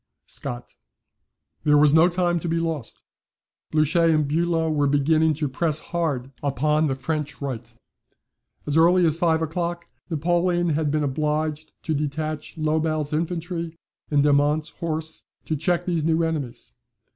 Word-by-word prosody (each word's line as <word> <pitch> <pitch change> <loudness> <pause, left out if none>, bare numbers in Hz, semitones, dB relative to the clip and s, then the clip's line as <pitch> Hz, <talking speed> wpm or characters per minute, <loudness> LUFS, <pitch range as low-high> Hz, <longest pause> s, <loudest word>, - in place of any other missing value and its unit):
SCOTT.] 120 0 -6 0.9
There 150 -1 +5
was 145 0 +5
no 160 +3 +6
time 175 -1 +1
to 170 - -4
be 165 - 0
lost 165 -6 -4 0.7
Blucher 155 +2 +3
and 155 -3 +3
Bulow 165 +1 +1
were 145 -2 +2
beginning 155 +3 +3
to 150 0 -1
press 155 +3 0
hard 150 -7 -2
upon 150 +3 +1
the 135 - -1
French 150 +2 -3
right. 135 -5 -5 0.9
As 145 +1 0
early 175 +2 +5
as 160 0 +2
five 165 -2 +2
o'clock, 170 +2 -3 0.2
Napoleon 175 +2 +1
had 155 -1 0
been 150 +1 0
obliged 150 +2 -1
to 160 - -1
detach 155 +2 -3
Lobau's 155 -1 0
infantry 170 +1 -3 0.3
and 145 -2 +3
Domont's 145 +1 +2
horse 160 -1 -4 0.2
to 155 - -1
check 170 +3 0
these 170 -4 0
new 165 +1 +2
enemies. 150 - -3
155 Hz, 145 wpm, -24 LUFS, 150-165 Hz, 0.9 s, no